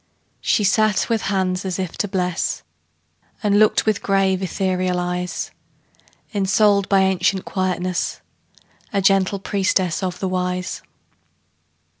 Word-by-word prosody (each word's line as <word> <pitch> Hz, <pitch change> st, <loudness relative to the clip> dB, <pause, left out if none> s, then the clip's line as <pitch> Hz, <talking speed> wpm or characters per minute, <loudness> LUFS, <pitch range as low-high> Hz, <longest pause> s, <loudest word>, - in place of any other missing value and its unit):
She 210 Hz, -, +2 dB
sat 210 Hz, +1 st, +2 dB
with 225 Hz, -2 st, +1 dB
hands 185 Hz, -2 st, 0 dB
as 185 Hz, -2 st, -3 dB
if 185 Hz, -3 st, -4 dB
to 205 Hz, -, +1 dB
bless, 180 Hz, -3 st, -1 dB, 0.8 s
And 205 Hz, -1 st, +3 dB
looked 215 Hz, 0 st, +4 dB
with 215 Hz, -2 st, +1 dB
grave, 195 Hz, -1 st, +1 dB
ethereal 185 Hz, -1 st, -1 dB
eyes; 180 Hz, 0 st, -3 dB, 0.8 s
Ensouled 200 Hz, 0 st, +3 dB
by 195 Hz, -1 st, +4 dB
ancient 190 Hz, 0 st, +1 dB
quietness, 185 Hz, -1 st, -2 dB, 0.7 s
A 200 Hz, -, +1 dB
gentle 195 Hz, 0 st, +3 dB
priestess 190 Hz, -3 st, 0 dB
of 185 Hz, -2 st, -2 dB
the 190 Hz, -, -1 dB
Wise. 180 Hz, 0 st, -2 dB
190 Hz, 120 wpm, -21 LUFS, 180-200 Hz, 0.8 s, looked